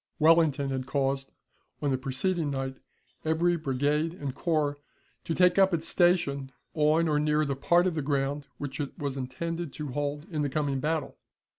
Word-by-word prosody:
Wellington 155 Hz, -4 st, +4 dB
had 130 Hz, -1 st, -3 dB
caused, 135 Hz, -1 st, -1 dB, 0.5 s
on 145 Hz, -, 0 dB
the 130 Hz, -, +1 dB
preceding 150 Hz, +5 st, -1 dB
night, 135 Hz, -1 st, -3 dB, 0.5 s
every 165 Hz, +2 st, +2 dB
brigade 150 Hz, +2 st, 0 dB
and 140 Hz, -6 st, -4 dB
corps 150 Hz, -3 st, 0 dB, 0.5 s
to 165 Hz, -, -1 dB
take 180 Hz, +1 st, +4 dB
up 190 Hz, -2 st, +5 dB
its 165 Hz, 0 st, -2 dB
station 165 Hz, -7 st, +2 dB, 0.2 s
on 155 Hz, +2 st, +3 dB
or 150 Hz, -1 st, +2 dB
near 150 Hz, 0 st, +2 dB
the 140 Hz, -1 st, -1 dB
part 175 Hz, +6 st, +3 dB
of 185 Hz, -, +1 dB
the 155 Hz, -, -1 dB
ground 140 Hz, 0 st, -1 dB
which 140 Hz, -1 st, -5 dB
it 145 Hz, -2 st, -4 dB
was 140 Hz, -4 st, -3 dB
intended 165 Hz, +5 st, -4 dB
to 150 Hz, -2 st, -5 dB
hold 145 Hz, +2 st, -3 dB
in 155 Hz, -2 st, -1 dB
the 145 Hz, -, 0 dB
coming 140 Hz, -1 st, -1 dB
battle. 155 Hz, +1 st, -2 dB
150 Hz, 175 wpm, -28 LUFS, 140-165 Hz, 0.5 s, up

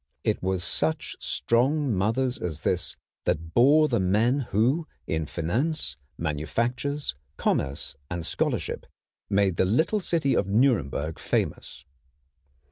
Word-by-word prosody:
It -, -, 0 dB
was 95 Hz, -1 st, 0 dB
such 80 Hz, 0 st, -1 dB
strong 130 Hz, -, +1 dB
mothers 115 Hz, +7 st, +1 dB
as 80 Hz, -4 st, -4 dB
this -, -, 0 dB, 0.3 s
that 80 Hz, +1 st, -1 dB
bore 145 Hz, +6 st, +6 dB
the 120 Hz, -6 st, +1 dB
men 110 Hz, +9 st, +2 dB
who 130 Hz, -, +2 dB, 0.2 s
in 80 Hz, -1 st, -1 dB
finance, 120 Hz, -, -1 dB, 0.2 s
manufactures, 120 Hz, -, -1 dB, 0.2 s
commerce, 70 Hz, +1 st, -1 dB
and 85 Hz, -2 st, -3 dB
scholarship -, -, -1 dB, 0.4 s
made 100 Hz, -3 st, +2 dB
the -, -, +4 dB
little 160 Hz, -, +2 dB
city 165 Hz, -7 st, +1 dB
of -, -, +1 dB
Nuremberg 100 Hz, -, +1 dB
famous. -, -, -2 dB
110 Hz, 120 wpm, -26 LUFS, 85-135 Hz, 0.4 s, bore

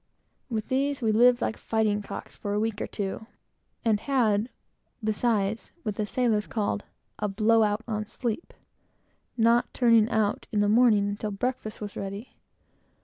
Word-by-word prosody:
With 220 Hz, -3 st, -3 dB
these 275 Hz, 0 st, 0 dB
we 220 Hz, -, +3 dB
lived 240 Hz, +3 st, +5 dB
like 220 Hz, -, -1 dB
fighting 215 Hz, -2 st, 0 dB
cocks 200 Hz, -, -8 dB
for 205 Hz, -, -4 dB
a -, -, +1 dB
week 220 Hz, -1 st, -1 dB
or -, -, -2 dB
two, 205 Hz, +2 st, -4 dB, 0.6 s
and 215 Hz, -2 st, +3 dB
had, 230 Hz, -4 st, +1 dB, 0.5 s
besides, 215 Hz, -1 st, 0 dB
what 210 Hz, -, -2 dB
the 210 Hz, 0 st, -2 dB
sailors 220 Hz, -3 st, +1 dB
call 210 Hz, -2 st, -1 dB, 0.4 s
"a 210 Hz, -, 0 dB
blow 220 Hz, +3 st, +3 dB
out 210 Hz, +1 st, +1 dB
on 215 Hz, -2 st, -3 dB
sleep;" 235 Hz, +6 st, -4 dB, 0.9 s
not 230 Hz, +1 st, +3 dB
turning 230 Hz, -3 st, +5 dB
out 215 Hz, -3 st, 0 dB
in 210 Hz, -, +1 dB
the 205 Hz, -, +3 dB
morning 215 Hz, -2 st, +4 dB
until 205 Hz, +1 st, -3 dB
breakfast 220 Hz, +1 st, -3 dB
was 205 Hz, -1 st, -6 dB
ready. 200 Hz, +4 st, -6 dB
220 Hz, 155 wpm, -27 LUFS, 205-235 Hz, 0.9 s, lived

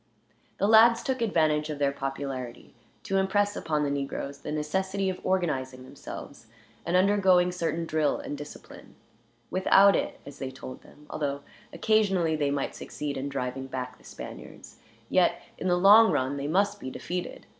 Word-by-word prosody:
The 200 Hz, -, +1 dB
lads 230 Hz, +2 st, +6 dB
took 260 Hz, -2 st, -2 dB
advantage 155 Hz, -8 st, +1 dB
of 150 Hz, -, -4 dB
their 140 Hz, -1 st, +1 dB
popularity 135 Hz, -3 st, -5 dB, 0.3 s
to 195 Hz, -, -1 dB
impress 205 Hz, +2 st, +1 dB
upon 150 Hz, -2 st, -1 dB
the 145 Hz, -, 0 dB
negroes 140 Hz, 0 st, -4 dB
the 150 Hz, -, -6 dB
necessity 190 Hz, +6 st, -1 dB
of 185 Hz, -, -9 dB
organizing 135 Hz, -9 st, -1 dB
themselves, 130 Hz, -2 st, -10 dB, 0.4 s
and 175 Hz, +1 st, +3 dB
undergoing 185 Hz, -2 st, +4 dB
certain 170 Hz, -1 st, -2 dB
drill 155 Hz, -2 st, +1 dB
and 145 Hz, -, -6 dB
discipline; 145 Hz, +1 st, -11 dB, 0.6 s
without 195 Hz, +1 st, +5 dB
it, -, -, -2 dB
as 140 Hz, -1 st, -11 dB
they 135 Hz, -, -4 dB
told 130 Hz, 0 st, -9 dB
them, 150 Hz, -, -18 dB
although 140 Hz, -2 st, -2 dB, 0.3 s
occasionally 195 Hz, -7 st, +2 dB
they 145 Hz, -2 st, 0 dB
might 140 Hz, -1 st, -2 dB
succeed 145 Hz, -1 st, -5 dB
in 135 Hz, +1 st, -3 dB
driving 135 Hz, -1 st, -4 dB
back 125 Hz, -1 st, -6 dB
the -, -, -22 dB
Spaniards, -, -, -10 dB, 0.3 s
yet -, -, +2 dB, 0.2 s
in 185 Hz, -, -2 dB
the 180 Hz, -1 st, +3 dB
long 210 Hz, +5 st, +7 dB
run 130 Hz, +2 st, 0 dB
they 140 Hz, +1 st, -3 dB
must 200 Hz, +5 st, +1 dB
be 130 Hz, -, -6 dB
defeated. 175 Hz, +6 st, -5 dB
155 Hz, 165 wpm, -27 LUFS, 140-190 Hz, 0.6 s, long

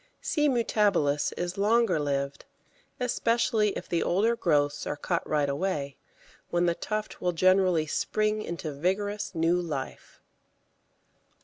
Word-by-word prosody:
C. 300 Hz, -2 st, +1 dB
mutabilis 205 Hz, -, +1 dB
is 175 Hz, +2 st, -3 dB
longer 225 Hz, -3 st, +3 dB
lived, 140 Hz, -1 st, -2 dB, 0.5 s
especially 230 Hz, -3 st, +1 dB
if -, -, -7 dB
the 170 Hz, -, 0 dB
older 215 Hz, +6 st, +2 dB
growths 145 Hz, -8 st, +1 dB
are 145 Hz, -, -3 dB
cut 170 Hz, +3 st, -1 dB
right 150 Hz, -2 st, +1 dB
away, 140 Hz, -2 st, -2 dB, 0.5 s
when 175 Hz, 0 st, +1 dB
the 170 Hz, -, +2 dB
tuft 215 Hz, +4 st, -4 dB
will 180 Hz, 0 st, 0 dB
generally 185 Hz, -2 st, +3 dB
spring 215 Hz, +7 st, 0 dB
into 170 Hz, -5 st, -5 dB
vigorous 195 Hz, +6 st, -2 dB
new 165 Hz, +2 st, +2 dB
life. 145 Hz, -6 st, -6 dB
180 Hz, 125 wpm, -28 LUFS, 150-210 Hz, 0.5 s, longer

